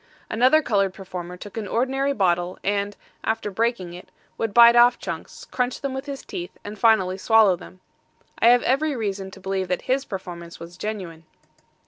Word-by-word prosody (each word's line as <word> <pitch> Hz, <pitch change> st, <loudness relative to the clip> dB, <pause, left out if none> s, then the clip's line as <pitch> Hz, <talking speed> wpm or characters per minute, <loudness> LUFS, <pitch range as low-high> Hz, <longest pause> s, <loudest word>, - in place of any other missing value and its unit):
Another 260 Hz, +7 st, +4 dB
colored 195 Hz, -6 st, +1 dB
performer 180 Hz, -2 st, -7 dB
took 205 Hz, +4 st, -10 dB
an 215 Hz, -2 st, -3 dB
ordinary 270 Hz, +5 st, 0 dB
bottle, 180 Hz, -6 st, 0 dB
and, 200 Hz, 0 st, -1 dB, 0.3 s
after 220 Hz, -2 st, -2 dB
breaking 220 Hz, -4 st, -1 dB
it, 180 Hz, -, -11 dB, 0.3 s
would 225 Hz, -2 st, -2 dB
bite 235 Hz, +2 st, +8 dB
off 240 Hz, 0 st, +6 dB
chunks, -, -, -7 dB
crunch 250 Hz, 0 st, -1 dB
them 275 Hz, -1 st, -3 dB
with 265 Hz, +2 st, -5 dB
his 280 Hz, -1 st, -6 dB
teeth, 175 Hz, 0 st, -7 dB
and 205 Hz, 0 st, -8 dB
finally 195 Hz, -5 st, +3 dB
swallow 220 Hz, -3 st, +5 dB
them. 185 Hz, +1 st, -14 dB, 0.6 s
I -, -, +4 dB
have 245 Hz, +1 st, +6 dB
every 285 Hz, +3 st, +1 dB
reason 200 Hz, -4 st, -3 dB
to -, -, -13 dB
believe 190 Hz, 0 st, -2 dB
that 180 Hz, -, -2 dB
his 265 Hz, +2 st, 0 dB
performance 175 Hz, -3 st, -8 dB
was 170 Hz, +1 st, -10 dB
genuine. 180 Hz, -5 st, -6 dB
205 Hz, 175 wpm, -23 LUFS, 185-240 Hz, 0.6 s, bite